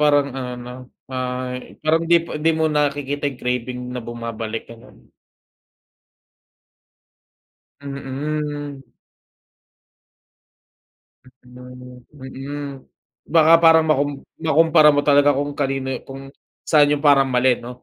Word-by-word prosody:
parang 145 -1 +3
ano, 125 -1 -5
'no, 120 0 -9 0.4
ah, 125 0 -3 0.2
parang 160 +2 +1
'di 170 +1 +4
pa - - -11
'di 155 +2 +1
mo 160 - +1
nakikita, 145 -1 -1
yung 130 -3 -11
craving 125 0 -3 0.2
na - - -4
bumabalik 115 -1 -5
ganun. 115 0 -16 2.7
Mm. 145 +1 -5 2.4
Mm, 125 0 -14
mm, 140 +1 -7 0.7
baka, 160 0 +6
parang 160 -1 +6
makum 145 -1 +2 0.3
makumpara 160 -1 +4
mo 145 - +2
talaga 145 0 +5
kung 145 +1 -3
kanino 135 -2 -2 0.2
kung 135 0 -10 0.4
saan 145 -2 +5
yung 145 0 -2
parang 135 -1 +5
mali 125 0 +3
no. 125 +1 -10
140 Hz, 110 wpm, -21 LUFS, 125-150 Hz, 2.7 s, baka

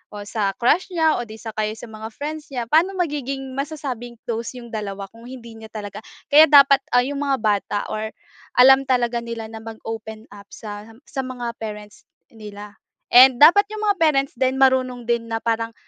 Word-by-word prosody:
o 205 - -6
sa 205 -1 -2
crush 300 +10 +2
niya 320 -2 +2
o 240 - -4
'di 215 - -10
sa 225 +1 -8
kaya 215 0 -2
sa 225 +1 -11
mga 220 0 -7
friends 300 +3 -6
niya, 240 -3 -4
paano 335 +7 +3
magiging 275 -6 -3
masasabing 275 -5 -5
close 230 0 -4
’yong 240 -1 -10
dalawa 200 -2 -5
kung 230 +1 -16
hindi 235 -3 -11
niya 220 0 -11
talaga 210 -2 -8 0.3
kaya 300 +2 +9
dapat 280 -1 +7 0.2
ah, 245 - +6
’yong 280 +2 -4
mga 280 -2 0
bata 205 -1 0
or 215 +1 -4 0.4
alam 265 +2 +6
talaga 240 -2 +1
nila 230 -1 -7
na 225 - -8
mag-open 220 0 -8
up 200 0 -13
sa 210 -1 -8 0.2
sa 270 - -3
mga 245 -2 -5
parents 210 -1 -8 0.3
nila. 210 -2 -11 0.3
And 255 +1 +7
dapat 405 +7 +8
’yong 430 +1 -7
mga 410 -2 +2
parents 280 -4 +2
din 260 0 +1
marunong 255 -2 +2
din 235 -1 +1
na 225 0 -3
parang 230 0 -1
235 Hz, 190 wpm, -21 LUFS, 220-275 Hz, 0.4 s, kaya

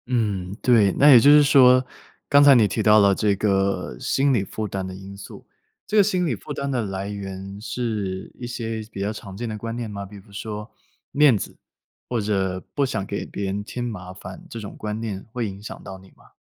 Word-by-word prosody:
嗯， 100 -6 -1
对， 110 -6 +5
那 145 - +5
也 125 - +10
就 140 - +5
是 150 0 +8
说， 130 -2 +6 0.4
刚 145 0 +6
才 140 -1 +8
你 110 -4 +5
提 100 +3 -2
到 110 0 +6
了 100 -1 +5
这 100 0 +1
个 95 -7 0
心 135 - +1
理 110 -6 +1
负 105 +2 -5
担 95 -1 -4
的 95 0 -7
因 95 +1 -10
素。 100 - -11 0.4
这 215 0 +4
心 185 -3 +1
理 160 - 0
负 150 - -7
担 140 0 -3
的 125 -3 0
来 95 0 -4
源 100 -1 -7
是 105 -5 -4
一 120 - -5
些 115 -2 -4
比 100 - -5
较 100 +2 -1
常 100 -3 -9
见 120 +2 -4
的 110 -1 -5
观 115 +2 -5
念 120 -2 -4
吗？ 100 -1 -6
比如说 105 +2 -8 0.4
面 145 -5 +5
子， - - -7 0.5
或 120 - 0
者 95 -3 -1
不 140 - +1
想 100 -7 -3
给 100 - -4
别 100 - -5
人 100 +2 -2
添 120 +3 -5
麻 95 -6 -6
烦， 95 0 -10
这 - - -8
种 105 -2 -8
观 105 0 -4
念 100 -4 -5
会 120 -3 -2
影 100 0 -8
响 105 - -9
到 95 - -8
你 95 0 -17
吗？ - - -23
105 Hz, 240 characters per minute, -23 LUFS, 95-120 Hz, 0.5 s, 也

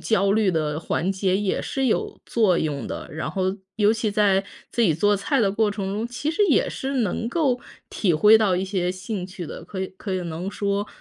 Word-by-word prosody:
焦 200 -3 +2
虑 210 -2 +3
的 155 -2 -1
缓 170 +3 -1
解 190 -1 +1
也 200 -1 0
是 270 -2 -1
有 225 - -1
作 210 -7 +3
用 145 -3 -2
的。 - - -6
然 155 0 -3
后 190 +2 -1 0.2
尤 210 0 +4
其 225 -1 -1
在 200 -2 +3 0.3
自 235 - -2
己 175 -8 +4
做 205 +5 +3
菜 265 +7 0
的 200 -3 +3
过 210 +2 +1
程 195 -2 -3
中， 220 +3 -2
其 245 +5 -3
实 330 - -4
也 310 - +3
是 270 +1 -4
能 225 +1 -1
够 260 -4 +1 0.3
体 180 -6 +1
会 210 +8 +7
到 205 -4 +2
一 185 - -1
些 185 -2 -1
兴 185 0 -5
趣 185 -2 -7
的， - - -8
可 185 +2 -6
以 190 - -2
可 195 -1 -4
以 185 - -1
能 170 +3 -4
说 200 0 -1
200 Hz, 240 characters per minute, -24 LUFS, 185-220 Hz, 0.3 s, 会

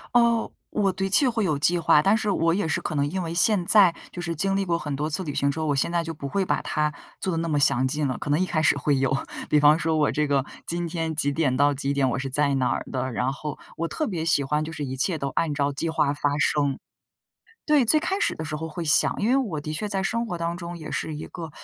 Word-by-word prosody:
哦， 235 -1 +3 0.2
我 200 -3 0
的 195 +1 -2
确 255 +7 +5
会 230 -2 -1
有 155 -7 0
计 175 +4 +2
划， 155 -3 +4
但 195 +6 +3
是 215 -1 -1
我 165 -4 +2
也 200 +1 0
是 160 - 0
可 - - -4
能 140 -1 +1
因 185 +6 -3
为 165 -1 -4
现 180 +1 +3
在 195 -4 +6 0.2
就 175 - -6
是 170 -1 -3
经 195 +5 0
历 195 - +1
过 170 -3 -1
很 145 -3 -4
多 150 +3 -2
次 160 +5 -2
旅 145 -2 -5
行 140 0 +1
之 160 - -6
后， 160 - -1
我 145 - +1
现 135 - 0
在 170 -1 0
就 165 - -4
不 145 - -9
会 195 +5 0
把 - - 0
它 150 -1 -1 0.3
做 190 - -2
得 165 - -2
那 165 0 -2
么 150 -2 +1
详 130 -3 +3
尽 145 +2 0
了， 130 - -3
可 - - -6
能 145 +2 +2
一 185 - +2
开 155 -3 -1
始 155 - +3
会 145 0 +1
有， 135 0 +1 0.4
比 150 - +4
方 150 +1 +6
说 160 -1 0
我 150 - +2
这 150 - +1
个 140 -2 +1 0.2
今 170 0 -2
天 165 -1 -3
几 145 -2 0
点 140 -5 +1
到 145 +1 +3
几 140 0 -2
点 135 -2 +1
我 - - -1
是 135 +1 -3
在 140 +1 +1
哪 130 -1 0
的， 130 0 -2
然 125 +3 -1
后 150 +1 -6 0.2
我 165 +1 -3
特 310 - -2
别 175 -7 -3
喜 160 -3 +3
欢 150 +2 0
就 155 - -6
是 150 -2 -5
一 130 0 -5
切 160 +6 0
都 140 - -3
按 165 -3 0
照 140 0 0
计 165 +4 -2
划 150 -3 +1
发 145 0 -1
生。 145 -1 +1 0.9
对， 300 -4 +4
最 310 +7 +4
开 380 +5 -2
始 - - 0
的 160 - -5
时 155 0 -4
候 160 +2 -4
会 165 +2 -5
想， 150 - +4
因 210 - 0
为 255 - +4
我 210 - -1
的 150 +1 -5
确 185 +7 -3
在 195 -2 -1
生 230 +5 -1
活 175 -3 -4
当 170 0 -2
中 170 -1 -7
也 155 - -8
是 155 - -3
一 150 - -7
个， 165 -3 -8
160 Hz, 310 characters per minute, -25 LUFS, 145-180 Hz, 0.9 s, 在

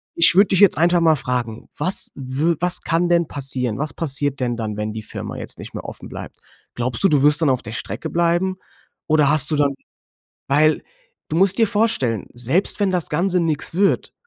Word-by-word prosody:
Ich 170 - +4
würde 200 +2 +5
dich 190 - +1
jetzt 200 -6 +5
einfach 175 +2 +3
mal 160 -1 +4
fragen: 120 -4 -4
Was 175 +6 +2
w 140 +5 -2
was 180 0 +4
kann 170 +2 0
denn 170 -1 +2
passieren? 130 -6 -2
Was 150 +1 -4
passiert 140 -3 -3
denn 120 -2 -2
dann, 110 -2 -5
wenn 105 0 -4
die 110 - -7
Firma - - -8
jetzt - - -8
nicht - - -10
mehr - - -7
offen - - -9
bleibt? - - -10 0.3
Glaubst 120 +4 +2
du, 195 - +4
du 145 -4 +2
wirst 150 +2 +4
dann 155 - +2
auf 130 -1 0
der 110 - -9
Strecke - - -6
bleiben? 175 +2 0 0.5
Oder 150 -2 +3
hast 150 0 +4
du 150 - +1
dann 145 -1 +1 0.7
Weil, 155 +3 +2 0.5
du 155 - -3
musst 195 +1 +3
dir 225 -2 +3
vorstellen, 200 - -1
selbst 130 - 0
wenn 195 - +1
das 180 -3 0
Ganze 180 +4 0
nix 160 -3 -2
wird, 195 +3 0
155 Hz, 205 wpm, -20 LUFS, 130-175 Hz, 0.7 s, würde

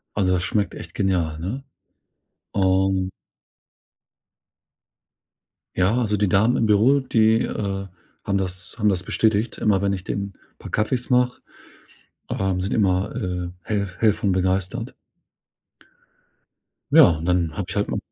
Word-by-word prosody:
Also, 95 -2 +1
das 90 0 0
schmeckt 100 -2 -1
echt - - -9
genial, 85 -5 0
ne? 115 +11 -4 0.9
Und 95 -1 +1 2.7
Ja, 95 +5 +2
also, 105 -3 0
die 100 0 +2
Damen 110 +5 +3
im 115 - +2
Büro, 110 +7 +4
die, 115 -3 +3
äh, 95 -3 -3 0.4
haben 100 0 0
das 90 -1 -4
haben 105 0 +3
das 95 -1 0
bestätigt. 110 +1 0
Immer 100 -3 +2
wenn 100 0 +1
ich 95 -1 -4
denen 100 0 -4 0.3
paar - - -9
Kaffees 120 +3 -1
mache, 125 0 +2 0.9
ähm, 95 -1 -1
sind 95 - -1
immer, 95 -3 +1
äh, 90 -1 -3
hell 100 -3 -2
hell 110 -3 +4
von 100 - -1
begeistert. 95 0 -1 2.0
Ja, - - +9
und 80 - -6
dann 90 -3 +1
habe - - -3
ich - - -5
halt - - 0
ma - - -1
95 Hz, 140 wpm, -23 LUFS, 95-110 Hz, 2.7 s, Ja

